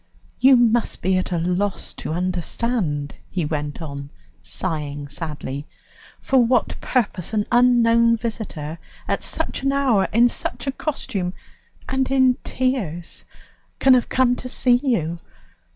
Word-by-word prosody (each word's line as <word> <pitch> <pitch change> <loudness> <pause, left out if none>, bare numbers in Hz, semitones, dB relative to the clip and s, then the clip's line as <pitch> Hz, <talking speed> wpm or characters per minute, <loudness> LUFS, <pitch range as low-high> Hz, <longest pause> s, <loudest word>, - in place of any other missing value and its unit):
"You 265 +1 +7
must 240 -1 +2
be 190 +1 +2
at 185 - -4
a 175 - +1
loss 180 +2 -1
to - - -6
understand," 180 - -1 0.2
he 175 -4 -2
went 150 +1 -3
on, 140 -2 -7 0.3
sighing 145 - -4
sadly, 145 -2 -5 0.5
"for 265 - +2
what 240 0 +1
purpose 215 -6 -1
an 210 -1 +1
unknown 235 -1 +5
visitor, 185 -9 -5 0.3
at - - 0
such - - -2
an 275 0 +1
hour, 265 -8 +2
in 235 +2 +5
such 245 +1 -4
a 275 - 0
costume, 215 - -3 0.5
and 265 0 0
in 260 -2 +4
tears, 210 - -2 0.5
can 265 - +5
have 250 -2 +3
come 255 -1 +3
to 255 - -6
see 245 -1 +3
you. 170 - 0
215 Hz, 135 wpm, -22 LUFS, 165-250 Hz, 0.5 s, You